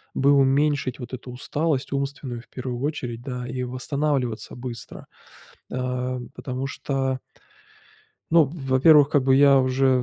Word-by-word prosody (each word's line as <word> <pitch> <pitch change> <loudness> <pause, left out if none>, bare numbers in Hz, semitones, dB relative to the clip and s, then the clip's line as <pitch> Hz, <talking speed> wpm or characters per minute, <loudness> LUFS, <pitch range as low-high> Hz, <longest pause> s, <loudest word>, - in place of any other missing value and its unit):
бы 140 +1 +4
уменьшить 140 -1 +2
вот 125 0 -8
эту 125 0 -7
усталость 145 +3 -2
умственную 140 -3 -3
в 115 - -23
первую 125 -2 -5
очередь, 130 -5 -3
да, 125 -1 -5
и 125 0 -3
восстанавливаться 130 -1 -2
быстро? 120 -2 -8 0.6
Ам, 125 0 -3
потому 130 +1 -4
что 135 -2 -2 1.1
ну 165 -1 +6
во-первых, 140 0 +4
как 140 -3 +2
бы 130 0 +4
я 140 0 +6
уже 130 0 +2
130 Hz, 130 wpm, -24 LUFS, 125-140 Hz, 1.1 s, ну